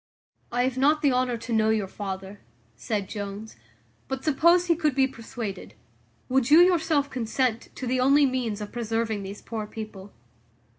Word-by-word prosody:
"I 245 +1 +1
have 260 0 -1
not 300 +3 +3
the 285 - +4
honour 250 -1 +1
to 230 +1 -5
know 220 -1 +3
your 215 -3 +1
father," 195 0 -6 0.4
said 200 - -3
Jones; 205 +1 -6 0.5
"but, 265 0 -4
suppose 340 +4 +4
he 340 -1 +3
could 305 -4 0
be 270 -1 +4
persuaded, 230 - -7 0.5
would 260 -1 +1
you 310 +3 +8
yourself 320 -5 +3
consent 240 -1 -1
to 260 - -5
the 255 +1 0
only 280 +3 +5
means 245 -5 -2
of 205 - -6
preserving 225 -2 -2
these 195 +1 -8
poor 220 -2 -5
people?" 210 -3 -8
240 Hz, 165 wpm, -26 LUFS, 215-270 Hz, 0.5 s, you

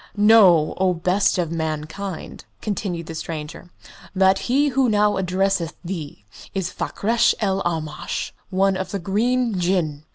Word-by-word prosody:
"Know, 205 -7 +6
O 185 -1 +2
best 185 +4 +1
of 170 -3 -1
mankind," 160 +3 -5
continued 190 -5 -3
the 165 - -7
stranger, 160 +1 -6 0.5
"that 190 0 +4
he 285 +4 +3
who 260 -1 +2
now 210 -1 +3
addresses 185 -2 0
thee 160 - -6 0.3
is 185 -2 -2
Fakrash 230 +5 +1
el 195 -2 0
Aamash, 160 -4 -3 0.2
one 195 0 +2
of 190 0 -4
the 200 - -3
Green 220 +3 0
Jinn. 170 -5 0
190 Hz, 135 wpm, -22 LUFS, 165-205 Hz, 0.5 s, Know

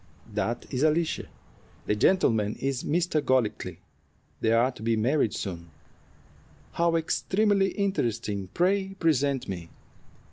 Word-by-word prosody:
"That 120 +1 -2
is 130 -1 -1
Alicia. 155 +1 +1 0.6
The 105 - +1
gentleman 110 - +2
is 135 -1 -2
Mr. 165 -1 +1
Golightly. 110 - 0 0.6
They 110 - +1
are 120 +3 +3
to 125 - -14
be 115 +1 +1
married 115 +1 +1
soon." 85 -3 -5 1.0
"How 170 0 +1
extremely 195 +4 +2
interesting! 115 - -1
Pray 195 +2 +1
present 145 -6 +1
me." 85 -3 -6
135 Hz, 115 wpm, -27 LUFS, 110-170 Hz, 1.0 s, are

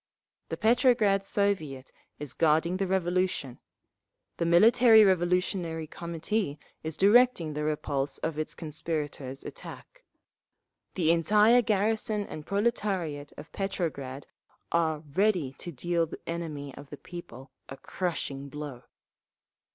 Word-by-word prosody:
The - - -3
Petrograd 220 -3 +3
Soviet 160 -11 -1 0.3
is 145 -3 -6
guarding 165 +3 +2
the 195 0 -1
Revolution. 180 -7 -1 0.8
The 170 - 0
Military 220 +5 +7
Revolutionary 180 -3 +1
Committee 170 +1 -3 0.2
is 160 -1 -4
directing 205 -6 +4
the 150 +1 -3
repulse 145 -2 -1
of 160 - -2
the 155 +1 -2
conspirators' 150 -4 -5
attack. - - -10 0.9
The 165 -3 +3
entire 210 +8 +5
garrison 215 0 0
and 155 -5 -9
proletariat 195 -9 -1
of 150 +2 -11
Petrograd 145 -9 -4 0.5
are 160 -2 +1
ready 185 -8 +1
to 175 - -6
deal 170 +3 0
the - - -9
enemy 155 -5 -5
of 140 +1 -12
the 145 - -8
people 155 -7 -10 0.2
a 135 - -8
crushing 140 -6 -4
blow. 145 -4 -8
170 Hz, 115 wpm, -28 LUFS, 150-200 Hz, 0.9 s, Military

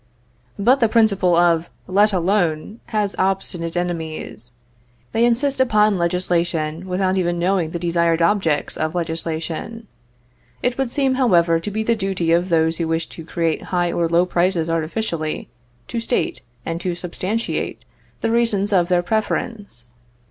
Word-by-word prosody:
But 245 +7 +4
the 230 -3 +3
principle 200 -6 +3
of 170 -1 +3 0.2
"let 205 +3 +3
alone" 185 +1 0
has 210 -2 -1
obstinate 185 -3 -1
enemies. 160 -9 -4 0.6
They 230 - +2
insist 260 +3 +2
upon 215 -5 +3
legislation 170 -1 -1
without 185 +1 0
even 175 -1 0
knowing 175 -1 +1
the 170 - -4
desired 170 -1 +1
objects 170 -4 +1
of 155 +2 -2
legislation. 165 +6 -3 0.8
It 250 0 +1
would 265 -3 0
seem, 270 +1 +1
however, 170 -8 +4
to 185 - -5
be 220 +2 -2
the 230 +1 +2
duty 190 -5 -1
of 175 +2 +2
those 160 -1 +2
who 165 - -1
wish 165 0 -1
to 165 - -9
create 165 0 -2
high 175 -1 +1
or 170 -1 0
low 170 +2 +3
prices 175 -2 +1
artificially, 165 -1 -2 0.4
to 235 - -2
state, 230 +2 -1 0.2
and 165 +1 -3
to 180 -1 -2
substantiate, 185 +6 -3 0.4
the 225 - 0
reasons 215 -3 +2
of 175 -3 +3
their 175 -1 +2
preference. 205 - -3
180 Hz, 150 wpm, -21 LUFS, 165-210 Hz, 0.8 s, But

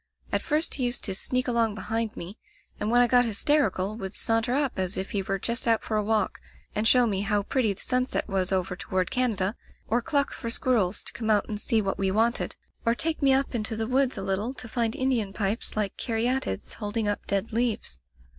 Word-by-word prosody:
At - - +1
first 310 0 0
he 260 - 0
used 240 0 -1
to 195 - -1
sneak 255 +7 0
along 230 -3 +1
behind 225 +2 -2
me, 185 +6 -7 0.4
and 210 - -1
when 240 +1 +5
I 245 - +5
got 245 0 +5
hysterical 215 -4 +1
would 195 -2 -6
saunter 225 +1 +1
up 280 -7 0
as 185 +1 -1
if 190 +1 -3
he 205 -3 0
Wjcre 195 0 -2
just 235 +1 0
out 225 -1 +3
for 220 - -2
a 210 - +1
walk, 215 0 0 0.3
and 215 +1 +1
show 250 +1 +6
me 200 -4 0
how 205 0 +1
pretty 230 0 +1
the 195 - -7
sunset 255 0 0
was 195 -2 0
over 185 -1 0
toward 185 0 -2
Canada, 220 -5 +1 0.3
or 240 +2 +1
cluck 280 +3 0
for 230 - -5
squirrels 225 -6 +2
to - - -4
come 225 -2 -3
out 210 -2 +3
and 210 -1 -4
see 220 -2 +2
what 195 - -2
we 195 -1 +1
wanted, 225 +5 +1 0.3
or 230 0 +2
take 320 +4 -1
me 275 -1 +5
up 270 +1 +2
into 220 -1 -1
the 220 0 -1
woods 260 +1 +1
a 195 - -3
little 200 +7 -2
to 250 - -6
find 230 -1 -1
Indian 240 -7 0
pipes 210 +2 -1
like 205 -2 -1
carya 240 +3 +1
tides 95 - -4
holding 210 0 -1
up 205 - -2
dead 200 +3 -1
leaves. 225 - -1
225 Hz, 225 wpm, -27 LUFS, 200-245 Hz, 0.4 s, show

